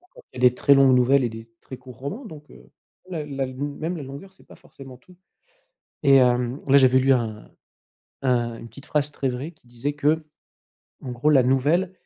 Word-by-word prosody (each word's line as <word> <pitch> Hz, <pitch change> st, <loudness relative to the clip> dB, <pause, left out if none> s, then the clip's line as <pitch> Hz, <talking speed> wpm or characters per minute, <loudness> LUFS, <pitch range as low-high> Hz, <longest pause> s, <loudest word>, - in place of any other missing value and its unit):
Encore -, -, -20 dB
qu'il 125 Hz, -, -7 dB
y -, -, +4 dB
a 125 Hz, -, +9 dB
des 125 Hz, -, -8 dB
très 140 Hz, -, +4 dB
longues 135 Hz, -2 st, +5 dB
nouvelles 130 Hz, +2 st, +3 dB
et 120 Hz, -, 0 dB
des 115 Hz, +1 st, -10 dB
très 130 Hz, -, -10 dB
courts 125 Hz, -2 st, -14 dB
romans, 195 Hz, -, -6 dB
donc, 150 Hz, -6 st, -13 dB
heu, 60 Hz, 0 st, -17 dB, 0.4 s
même 150 Hz, -4 st, -5 dB
la 135 Hz, -1 st, -1 dB
la 130 Hz, -, -8 dB
même 145 Hz, +5 st, -4 dB
la 155 Hz, -, -7 dB
longueur, 140 Hz, +8 st, -10 dB
c'est 190 Hz, -, -23 dB
pas -, -, -16 dB
forcément 135 Hz, -2 st, -14 dB
tout. 180 Hz, +8 st, -21 dB, 0.9 s
Et 135 Hz, -1 st, +6 dB
hem, 125 Hz, +1 st, +1 dB
là, 140 Hz, -, +5 dB
j'avais 130 Hz, -1 st, +5 dB
lu 135 Hz, +1 st, +3 dB
un 110 Hz, -4 st, -3 dB, 0.7 s
un 120 Hz, -3 st, 0 dB
une 115 Hz, -, -11 dB
petite 140 Hz, +3 st, -15 dB
phrase 150 Hz, -1 st, -1 dB
très 135 Hz, -2 st, -3 dB
vraie 130 Hz, +6 st, -5 dB
qui 155 Hz, -7 st, -29 dB
disait 120 Hz, +5 st, -5 dB
qu'en 150 Hz, +2 st, +1 dB, 0.9 s
gros: 125 Hz, +5 st, -1 dB
«La 135 Hz, -4 st, +5 dB
nouvelle 150 Hz, +9 st, +1 dB
135 Hz, 215 wpm, -23 LUFS, 125-150 Hz, 0.9 s, a